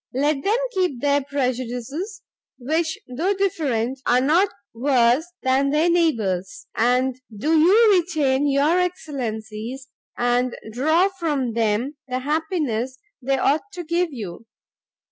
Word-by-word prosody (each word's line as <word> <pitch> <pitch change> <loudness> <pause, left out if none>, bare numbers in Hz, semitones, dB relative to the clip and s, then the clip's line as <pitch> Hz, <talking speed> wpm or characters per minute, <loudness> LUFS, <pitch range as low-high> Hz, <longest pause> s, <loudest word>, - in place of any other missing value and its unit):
Let 280 +1 +1
them 425 +4 +2
keep 365 - 0
their 285 +1 +2
prejudices, 270 - -3 0.3
which, 315 +6 -1
though 325 +11 -1
different, 270 - -1
are 245 - +4
not 330 +9 +3 0.2
worse 250 +3 +2 0.2
than 265 +1 +2
their 310 +4 +2
neighbours, 220 - 0
and 250 +2 +1 0.2
do 310 +10 +1
you 415 +7 +6
retain 290 -5 +1
your 290 +6 +3
excellencies, 260 - -4 0.3
and 245 0 +1 0.2
draw 315 - +3
from 285 -8 -1
them 230 +5 0
the 255 -1 -2
happiness 280 - -2 0.2
they 270 +2 0
ought 310 +10 +1
to 355 - -5
give 340 +1 0
you. 225 -3 -8
275 Hz, 125 wpm, -22 LUFS, 245-325 Hz, 0.3 s, you